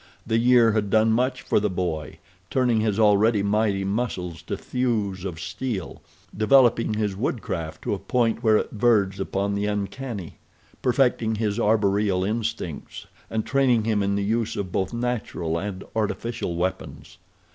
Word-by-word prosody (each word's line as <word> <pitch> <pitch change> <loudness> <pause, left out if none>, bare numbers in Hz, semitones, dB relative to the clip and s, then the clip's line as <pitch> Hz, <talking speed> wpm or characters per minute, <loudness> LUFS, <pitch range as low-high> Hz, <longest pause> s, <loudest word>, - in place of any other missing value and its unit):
The 115 0 +1
year 120 -1 +5
had 105 -2 0
done 110 +2 +4
much 125 +2 0
for - - +2
the 105 0 0
boy—turning 95 - -2
his 110 -1 0
already 105 0 +4
mighty 100 -1 +1
muscles 95 -5 -3
to - - -4
thews 110 -7 -1
of 90 -4 -5
steel, 100 +4 -4 0.3
developing 115 -1 +4
his 105 -2 -1
woodcraft 85 - -3
to - - -1
a - - -3
point 120 -3 0
where 110 -2 +4
it - - -2
verged 105 -4 +2
upon 100 +1 -1
the 100 +1 -1
uncanny, 105 -1 -4 0.4
perfecting 120 -3 +2
his 105 -2 -1
arboreal 100 -3 +2
instincts, 110 -6 -4 0.2
and 110 -1 -2
training 130 -5 +2
him 110 -2 +1
in 100 0 0
the 100 - 0
use 115 +2 0
of 95 -3 -4
both 95 +1 -1
natural 115 -9 -2
and 100 0 -5
artificial 110 -3 -2
weapons. 85 -2 -4
105 Hz, 150 wpm, -24 LUFS, 95-115 Hz, 0.4 s, year